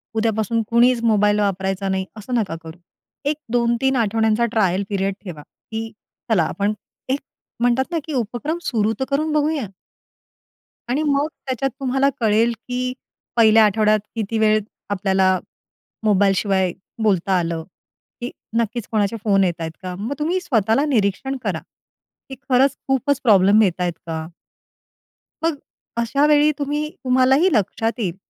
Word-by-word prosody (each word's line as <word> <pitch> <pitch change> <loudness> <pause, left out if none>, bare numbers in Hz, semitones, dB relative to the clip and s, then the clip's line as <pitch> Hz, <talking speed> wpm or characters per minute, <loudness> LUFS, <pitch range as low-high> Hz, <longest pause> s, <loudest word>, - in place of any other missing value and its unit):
उद्यापासून 220 0 +1
कुणीच 240 +1 +4
मोबाईल 210 -2 +3
वापरायचा 195 -1 -1
नाही 190 0 -1
असं 215 +4 -7
नका 205 -8 0
करू. 160 +1 -10 0.5
एक 305 - 0 0.2
2-3 240 +2 +2
आठवड्यांचा 225 0 +2
ट्रायल 195 -4 +1
पिरियड 195 -1 0
ठेवा, 175 -7 -8
की 225 +8 -8 0.4
चला 185 -7 +4
आपण 200 +6 -1 0.4
एक 270 +2 +1 0.4
म्हणतात 245 +5 +1
ना, 335 - 0
की 315 - -5
उपक्रम 250 +6 -2
सुरू 220 -5 +1
तर 265 - 0
करून 305 +3 0
बघूया. 300 -6 0 1.2
आणि 265 +5 +1
मग 285 +1 +2 0.2
त्याच्यात 265 0 -1
तुम्हाला 270 +1 +2
कळेल, 225 +1 +3 0.2
की 250 0 -2 0.4
पहिल्या 220 -1 +6
आठवड्यात 215 +1 +3 0.2
किती 225 0 -2
वेळ 215 0 +4 0.3
आपल्याला 190 -2 +2 0.6
मोबाईल 200 -2 +4
शिवाय 190 -3 +1 0.3
बोलता 190 -2 +2
आलं? 165 -1 -2 0.6
की 245 - -4 0.3
नक्कीच 230 0 -1
कोणाचे 215 0 +1
फोन 195 -2 +3
येत 180 -2 +1
आहेत 160 0 -3
का? 180 -1 -4
मग 210 +8 -3
तुम्ही 335 +5 0
स्वतःला 230 - +2
निरीक्षण 260 0 0
करा, - - -1 0.7
की 265 - -6
खरंच 265 +2 +4
खूपच 270 +1 +1
प्रॉब्लेम 205 -2 +5
येत 180 -3 0
आहेत 175 -1 0
का? 160 -1 -4 1.2
मग 330 0 +2
अ, 275 -4 -8
अशा 275 +5 +2
वेळी 300 0 +5
तुम्ही 295 +1 -1
तुम्हालाही 260 +6 +4
लक्षात 225 +1 +1
येईल, 180 -6 -2
225 Hz, 145 wpm, -21 LUFS, 200-260 Hz, 1.2 s, पहिल्या